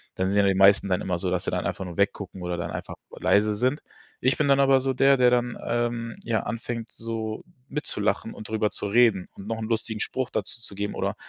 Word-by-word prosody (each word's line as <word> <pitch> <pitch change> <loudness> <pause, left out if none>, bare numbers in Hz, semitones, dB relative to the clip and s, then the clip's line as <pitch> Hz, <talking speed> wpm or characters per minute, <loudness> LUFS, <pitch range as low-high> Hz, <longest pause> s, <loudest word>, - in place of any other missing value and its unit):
dann 95 0 0
sind 100 - +1
ja 100 - +4
die 95 - +3
meisten 100 +1 +6
dann 90 - +1
immer 90 -2 -2
so, 90 0 -1
dass 90 - 0
sie - - -2
dann - - -1
einfach - - -3
nur 90 -2 -8
weggucken 100 -1 -1
oder 90 0 -2
dann 85 - -4
einfach - - -6 0.2
leise 105 +1 +2
sind. 130 +7 +1 0.4
Ich 130 +2 +2
bin 150 - +2
dann 140 0 +4
aber 135 -1 +5
so 135 0 -1
der, 135 +1 +5
der 125 -1 +5
dann, 120 0 +1
ähm, 120 -1 -1
ja, 110 -3 0
anfängt 115 0 -4
so 110 -1 -5 0.2
mitzulachen 115 -7 -2
und 105 - -9
drüber 110 -1 0
zu 100 - -4
reden 110 -4 +4
und 100 - -10
noch 115 0 -2
'n 110 - -3
lustigen 110 -1 -2
Spruch 130 +2 -2
dazu 115 - -4
zu 105 - -11
geben 105 +1 -3
oder - - -1
110 Hz, 240 wpm, -26 LUFS, 100-120 Hz, 0.4 s, meisten